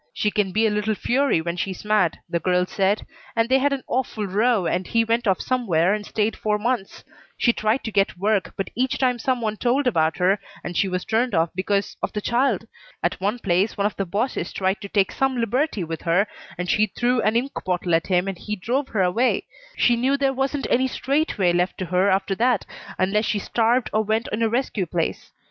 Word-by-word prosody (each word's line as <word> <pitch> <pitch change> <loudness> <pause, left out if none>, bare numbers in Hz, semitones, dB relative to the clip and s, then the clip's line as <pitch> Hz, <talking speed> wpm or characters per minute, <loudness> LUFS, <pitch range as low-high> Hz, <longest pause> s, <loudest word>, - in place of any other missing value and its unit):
She 210 - +1
can 205 -3 0
be 220 +4 +2
a 220 - +2
little 210 +1 0
fury 265 -5 +1
when 170 +1 -3
she's 185 +3 -4
mad, 210 -6 +2
the 170 - -1
girl 180 +1 +1
said, 195 +2 0 0.3
and 230 0 +2
they 265 +2 +4
had 285 +2 +2
an 275 -2 -2
awful 245 -4 -2
row 210 +1 +2
and 180 +2 -1
he 230 0 +2
went 230 +1 0
off 190 -2 +2
somewhere 195 -8 +1
and 210 0 -2
stayed 215 0 0
four 210 -1 0
months. 225 -2 -2 0.3
She 235 - +3
tried 215 +4 0
to 220 - -4
get 195 -3 +1
work, 200 +1 0
but 195 - -3
each 255 +2 0
time 250 -2 +1
some 255 0 0
one 215 -1 -2
told 255 +5 +1
about 160 -9 +2
her 190 +3 +2 0.2
and 175 - -5
she 195 - +2
was 180 -1 -3
turned 235 +3 +1
off 165 0 +2
because 195 +2 -1
of - - -2
the 210 - -1
child. 235 -1 +1 0.4
At - - -1
one 205 +5 0
place 195 -1 0
one 200 - +1
of 210 - 0
the 195 - -3
bosses 200 -1 -2
tried 190 +1 -1
to 200 - -7
take 195 -2 +2
some 270 -1 0
liberty 235 - 0
with 165 -1 -5
her 180 +4 +2 0.3
and 180 0 -3
she 215 +4 +3
threw 245 +4 0
an 215 +1 +1
ink 255 +4 0
bottle 180 -1 -1
at 165 0 +2
him 180 0 +2
and 195 -3 -4
he 210 - -4
drove 250 +8 -1
her 200 -4 0
away. 225 +8 +1 0.3
She 240 - +4
knew 260 +4 +1
there 275 -1 +1
wasn't 270 +1 -1
any 260 +2 +3
straight 280 +4 -1
way 180 -3 +3
left 180 +1 0
to 185 - -3
her 180 +3 +2
after 195 +1 +1
that 240 -3 +2 0.3
unless 210 +4 +1
she 215 - 0
starved 230 +4 +1
or 215 - +2
went 220 +2 0
in 215 - -2
a 225 - +3
rescue 230 -6 -1
place. 165 0 -3
210 Hz, 230 wpm, -23 LUFS, 185-240 Hz, 0.4 s, they